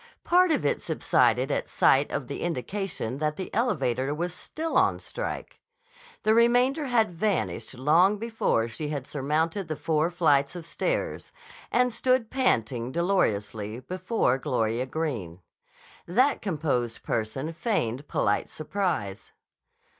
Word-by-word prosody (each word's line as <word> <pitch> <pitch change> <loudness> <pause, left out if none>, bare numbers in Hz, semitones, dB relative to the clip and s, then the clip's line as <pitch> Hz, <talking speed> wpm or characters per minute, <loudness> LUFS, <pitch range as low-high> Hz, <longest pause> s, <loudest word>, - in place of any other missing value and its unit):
Part 360 +1 +4
of 290 - +1
it - - +1
subsided 125 -4 +2
at - - -1
sight 135 +2 +4
of 140 -2 -3
the - - -5
indication 170 - -3
that 150 0 0
the 185 - -6
elevator 140 - 0
was 175 +2 -3
still 320 - -5
on - - +4
strike. - - -6 0.6
The 215 - +4
remainder 245 +6 +3
had 230 -6 +2
vanished 180 -5 -2
long 165 +10 +4
before 220 - 0
she 145 +7 -5
had 145 -4 -3
surmounted 160 +7 -1
the 155 - -3
four 160 +2 +1
flights 160 -4 +2
of 170 -2 -7
stairs - - -2 0.4
and 250 0 +2
stood 255 -2 +1
panting 120 - 0
dolorously 110 - 0
before 180 - 0
Gloria 125 -3 -1
Greene. 120 - -3 0.7
That 255 +11 +2
composed 145 - -1
person 130 +9 -2
feigned 145 - -1
polite - - 0
surprise. 155 - -3
160 Hz, 130 wpm, -27 LUFS, 130-210 Hz, 0.7 s, Part